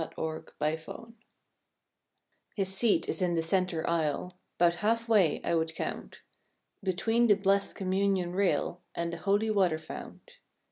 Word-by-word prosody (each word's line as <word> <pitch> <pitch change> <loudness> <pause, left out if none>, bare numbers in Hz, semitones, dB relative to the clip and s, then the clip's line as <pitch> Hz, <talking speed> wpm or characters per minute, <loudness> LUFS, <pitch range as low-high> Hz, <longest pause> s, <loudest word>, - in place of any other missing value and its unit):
THE 160 - -3
CHURCH 160 0 -4
END 155 +1 0
HOG 230 +8 -10 1.4
His 195 -2 +1
seat 225 +1 +3
is - - -2
in 175 -2 +1
the 165 - 0
center 180 -2 0
aisle, 170 +2 -1 0.2
'Bout 175 0 +3
half 230 +2 +1
way 200 -9 +3
I - - 0
would 160 -1 0
count. - - -6 0.6
Between 225 +5 +1
the 205 - +6
blest 195 0 +1
communion 190 -2 0
rail 185 -2 0
And 170 0 -2
the - - -4
holy 205 +4 +1
water 185 -6 +2
fount. - - -10
185 Hz, 150 wpm, -29 LUFS, 170-205 Hz, 1.4 s, the